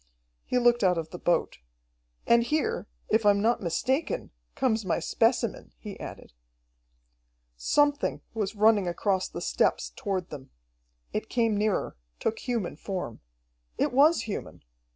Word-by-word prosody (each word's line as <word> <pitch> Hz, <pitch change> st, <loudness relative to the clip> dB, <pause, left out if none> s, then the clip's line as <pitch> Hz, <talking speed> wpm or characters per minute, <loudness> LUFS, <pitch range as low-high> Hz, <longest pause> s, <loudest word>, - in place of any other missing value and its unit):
He -, -, 0 dB
looked 240 Hz, -2 st, +4 dB
out 180 Hz, -2 st, +4 dB
of 160 Hz, -1 st, -4 dB
the 180 Hz, -, -7 dB
boat. 175 Hz, -, 0 dB, 0.7 s
"And 235 Hz, 0 st, +5 dB
here, 315 Hz, -, -1 dB, 0.2 s
if 220 Hz, +1 st, +3 dB
I'm 205 Hz, -1 st, +5 dB
not 230 Hz, +4 st, +2 dB
mistaken, 265 Hz, -, -1 dB, 0.2 s
comes 225 Hz, -4 st, +1 dB
my 185 Hz, -, 0 dB
specimen," 235 Hz, 0 st, 0 dB
he 205 Hz, -3 st, -9 dB
added. -, -, -9 dB, 1.2 s
Something 290 Hz, -, +1 dB
was 215 Hz, -2 st, -2 dB
running 210 Hz, -2 st, +4 dB
across 185 Hz, +2 st, 0 dB
the -, -, -6 dB
steppes -, -, +1 dB
toward 190 Hz, -4 st, -3 dB
them. 135 Hz, -3 st, -9 dB, 0.6 s
It -, -, -3 dB
came 230 Hz, -3 st, +1 dB
nearer, 210 Hz, -, 0 dB, 0.2 s
took 220 Hz, -, -1 dB
human 230 Hz, -, -3 dB
form. 180 Hz, -, -5 dB, 0.6 s
It -, -, +1 dB
was 300 Hz, +6 st, +5 dB
human! 210 Hz, -, -6 dB
215 Hz, 135 wpm, -28 LUFS, 185-240 Hz, 1.2 s, And